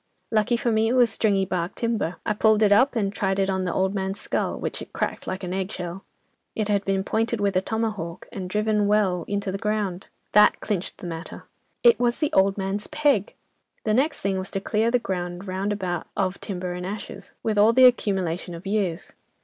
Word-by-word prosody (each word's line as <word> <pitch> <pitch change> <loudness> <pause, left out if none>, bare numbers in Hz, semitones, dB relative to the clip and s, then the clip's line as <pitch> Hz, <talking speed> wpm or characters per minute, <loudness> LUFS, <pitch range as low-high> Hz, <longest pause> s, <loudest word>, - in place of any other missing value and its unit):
Lucky 225 +2 +2
for 235 0 0
me, 220 0 +2
it 235 - +1
was 245 -3 +4
stringy 200 -3 +2
bark 180 -1 -2
timber. 225 -7 -1
I - - +1
pulled 215 +1 +3
it 205 - +4
up, 255 +7 +5
and 200 -3 0
tried 195 -1 0
it 195 0 +1
on 190 -1 -1
the 180 - -1
old 190 +2 +1
man's 195 0 -2
skull, - - -2
which - - -4
it - - -10
cracked - - -3
like 185 +1 -4
an 180 0 -3
egg 190 +1 -2
shell. 180 -1 -6 0.5
It 215 -1 -1
had 200 -1 +2
been 195 -1 0
pointed 225 +2 0
with 200 -2 0
a 185 - +3
tomahawk, 210 -6 -3
and 185 -2 -5
driven 210 +1 +1
well 195 -5 +2
into 200 -1 -2
the 195 - -4
ground. 210 -4 -2 0.2
That 210 0 +6
clinched 195 -4 -3
the - - -10
matter. 165 -1 -7 0.4
It 475 -1 +6
was 240 -1 +1
the 300 - -1
old 195 +1 +3
man's 195 +1 -2
peg! 290 -9 +1 0.5
The 215 - +1
next 275 +7 +1
thing 195 -1 0
was 185 - -5
to 195 - -2
clear 220 +3 +1
the 245 - +3
ground 185 -4 -4
round 190 +2 -2
about 185 -4 -3
of 190 -1 -1
timber 180 -2 -4
and 180 0 -5
ashes, 205 +3 -7
with 215 -2 +1
all 215 +2 +6
the 255 +2 +6
accumulation 190 -7 +1
of 170 - -10
years. 195 -4 -2
200 Hz, 215 wpm, -24 LUFS, 185-220 Hz, 0.5 s, That